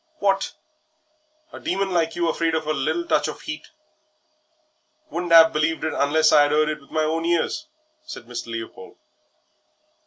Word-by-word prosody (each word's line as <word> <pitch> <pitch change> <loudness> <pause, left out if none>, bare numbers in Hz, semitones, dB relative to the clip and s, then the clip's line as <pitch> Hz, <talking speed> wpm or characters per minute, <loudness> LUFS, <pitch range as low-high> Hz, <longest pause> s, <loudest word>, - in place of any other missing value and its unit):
"What! 195 -6 0 1.0
a - - -8
Demon 195 +1 -1
like 165 -2 0
you 170 -1 0
afraid 165 0 0
of 160 -1 -2
a 155 - 0
little 155 +5 -1
touch 150 - +1
of - - -8
'eat; 155 0 -6 1.4
wouldn't 175 0 -3
'ave 165 -1 +8
believed 155 +2 0
it 160 - -1
unless 155 +2 +3
I 145 - +6
'ad 145 - -1
'eard 155 0 +3
it 150 -1 -4
with 140 - -20
my 155 -1 0
own 160 +1 -1
ears," 170 - 0 0.4
said 310 - -9
Mr. 120 0 -6
Leopold. 115 -4 -8
160 Hz, 165 wpm, -23 LUFS, 150-170 Hz, 1.4 s, ave